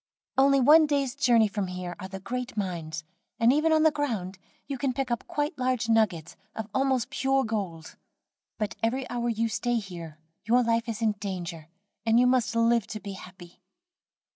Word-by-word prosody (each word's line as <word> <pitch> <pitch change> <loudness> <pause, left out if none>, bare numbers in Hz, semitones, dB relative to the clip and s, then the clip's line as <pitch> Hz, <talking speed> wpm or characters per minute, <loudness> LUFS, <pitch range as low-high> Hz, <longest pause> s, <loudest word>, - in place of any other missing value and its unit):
"Only 275 +1 +5
one 305 +4 +7
day's 280 -4 0
journey 240 -6 +4
from 200 -1 -3
here 180 -1 -5
are 190 - -6
the 190 0 -7
great 250 +3 -5
mines, 170 -5 -3 0.4
and 230 +2 +5
even 310 +3 +2
on 315 0 +4
the 315 - +6
ground 220 -11 -3 0.3
you 280 - -4
can 270 -1 0
pick 265 -1 -2
up 235 - -2
quite 295 +2 -2
large 255 -3 0
nuggets 200 -8 +1 0.2
of 220 -2 -4
almost 265 -2 +1
pure 270 0 +1
gold; 195 -8 -4 0.6
but 215 0 -3
every 250 +4 0
hour 240 0 -1
you 230 0 0
stay 240 +2 -1
here 170 -7 -7 0.3
your 245 +2 +3
life 230 0 0
is 230 0 -3
in 220 - +4
danger, 175 -5 -5 0.4
and 225 +1 +4
you 250 - +5
must 250 -2 +2
live 230 -1 +3
to 220 -2 -6
be 200 -2 -7
happy. 185 -2 -13
230 Hz, 185 wpm, -27 LUFS, 190-255 Hz, 0.6 s, one